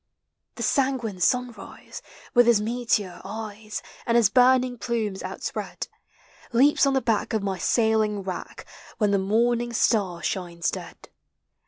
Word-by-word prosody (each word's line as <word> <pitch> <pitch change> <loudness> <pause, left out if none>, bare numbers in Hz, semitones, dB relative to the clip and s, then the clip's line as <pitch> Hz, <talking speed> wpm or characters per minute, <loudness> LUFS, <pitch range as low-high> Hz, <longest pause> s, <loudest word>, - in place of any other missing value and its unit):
The - - -4
sanguine 260 -8 0
sunrise, 245 +1 -2 0.3
with 245 -1 +5
his 235 -3 +5
meteor 215 -5 -1
eyes, 215 +1 -6 0.2
And 235 0 +3
his 220 -4 +4
burning 255 0 +4
plumes 220 -6 -2
outspread, - - -5 0.6
Leaps 275 +4 +4
on 275 - +2
the 265 - +2
back 225 -3 0
of 215 -2 0
my 190 -2 -2
sailing 220 -2 +1
rack. 185 -2 -6 0.3
When 210 -2 +2
the 200 - +3
morning 235 +4 +1
star 195 -7 +1
shines 170 -4 -2
dead. - - -9
220 Hz, 135 wpm, -25 LUFS, 200-240 Hz, 0.6 s, with